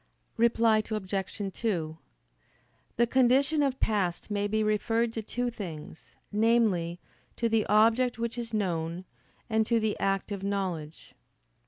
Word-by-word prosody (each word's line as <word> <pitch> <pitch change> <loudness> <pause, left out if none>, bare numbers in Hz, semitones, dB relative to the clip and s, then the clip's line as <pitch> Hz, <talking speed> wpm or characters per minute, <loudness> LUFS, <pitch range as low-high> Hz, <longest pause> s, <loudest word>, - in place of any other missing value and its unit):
Reply 230 -1 +3
Obj. 195 -1 -3
2: 165 -9 -2 1.0
The 235 - +4
condition 265 +5 +3
of 270 -2 0
past 200 -3 -1
may 205 0 0
be 215 +1 0
referred 225 +2 +1
to 225 - -3
two 245 +3 -2
things 165 -9 -9 0.2
namely, 210 -6 +2 0.4
to 235 - 0
the 225 -1 +1
object 225 +4 +3
which 235 0 -3
is 235 -1 -5
known, 175 -4 -2 0.4
and 220 -1 +2
to 235 -1 +3
the 215 -1 0
act 195 +1 0
of 200 -2 -4
knowledge. 185 -6 -4
215 Hz, 135 wpm, -28 LUFS, 195-230 Hz, 1.0 s, The